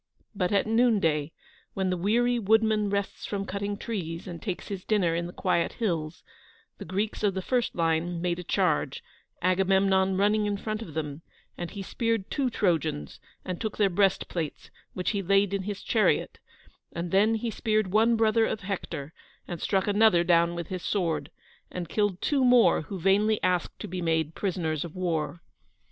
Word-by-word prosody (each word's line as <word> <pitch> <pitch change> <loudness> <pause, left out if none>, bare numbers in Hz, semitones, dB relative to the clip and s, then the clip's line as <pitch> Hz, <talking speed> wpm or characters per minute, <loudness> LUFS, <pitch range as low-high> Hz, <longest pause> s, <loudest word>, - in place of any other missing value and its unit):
But 180 -3 -1
at 200 -1 +2
noon 225 0 +3
day, 150 -3 0 0.4
when 190 -1 0
the - - +1
weary 235 +7 +2
woodman 220 -1 +3
rests 200 0 -3
from 200 -1 -3
cutting 200 +1 -3
trees, 170 -8 -4
and 170 -2 -7
takes 190 -5 -4
his 195 -3 -5
dinner 195 -6 +1
in 170 +1 -1
the - - -8
quiet 180 -2 0
hills, 165 -9 -2 0.6
the - - -7
Greeks 205 +3 -2
of 200 -3 +1
the 190 - -1
first 245 +1 0
line 165 +1 0
made 175 0 -1
a - - -5
charge, 160 -7 0 0.4
Agamemnon 190 +1 +3
running 210 +1 +2
in 205 -1 -1
front 215 +1 -4
of 165 -9 -9
them, 150 -1 -4 0.3
and 175 -1 -5
he 200 -1 -6
speared 230 -1 -2
two 275 -3 0
Trojans, 165 - -1 0.3
and 180 -2 -4
took 220 -2 -3
their 200 -3 +3
breastplates, 175 -4 -1 0.2
which 180 - -1
he 200 -2 -1
laid 195 +1 +2
in 200 - 0
his 200 +1 -5
chariot, 220 -2 +1 0.5
and 170 0 -4
then 210 +4 +4
he 225 +1 -2
speared 215 -4 0
one 225 +2 +4
brother 225 0 +3
of 215 - -3
Hector 165 -6 -5 0.3
and 175 -3 -6
struck 195 -1 +1
another 205 -4 +4
down 170 -1 +3
with 170 -2 -5
his 185 -1 -4
sword, 160 -8 -1 0.4
and 180 -2 -5
killed 205 0 0
two 280 -3 +1
more 245 -2 +5
who 190 +6 -6
vainly 205 +4 +3
asked 180 -2 0
to - - -5
be 180 0 -4
made 160 -2 0
prisoners 165 -6 -2
of 170 -1 -9
war. 170 -2 -2
190 Hz, 180 wpm, -27 LUFS, 170-210 Hz, 0.6 s, more